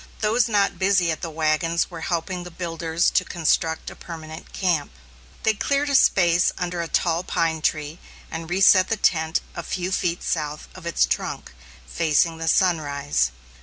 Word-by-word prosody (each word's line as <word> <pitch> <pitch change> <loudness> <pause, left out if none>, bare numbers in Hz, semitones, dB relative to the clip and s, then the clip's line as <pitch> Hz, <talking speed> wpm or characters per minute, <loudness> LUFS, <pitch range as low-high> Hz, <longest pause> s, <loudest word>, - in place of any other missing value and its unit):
Those 225 +2 +2
not 205 -2 +1
busy 185 -3 +3
at 160 - -4
the 170 - -4
wagons 160 +2 0
were 165 -2 -7
helping 175 +2 -2
the 180 - -8
builders 165 -1 -1
to - - +2
construct 160 -1 0
a - - -11
permanent 160 -2 -9
camp. 175 -6 0 0.5
They 220 - +3
cleared 280 +6 0
a - - +2
space 175 -7 +4
under 175 -1 -2
a 170 - -3
tall 170 0 +1
pine 165 -3 -1
tree 155 +1 -1 0.3
and 165 0 -6
reset 185 0 +5
the 225 - 0
tent 160 -3 +1
a 170 - -4
few 180 +2 -3
feet 175 -2 -1
south 150 -2 -3
of 185 -2 -9
its 170 - +3
trunk, - - -3 0.3
facing 160 - +1
the 165 - -4
sunrise. 145 - +1
170 Hz, 165 wpm, -23 LUFS, 160-185 Hz, 0.5 s, reset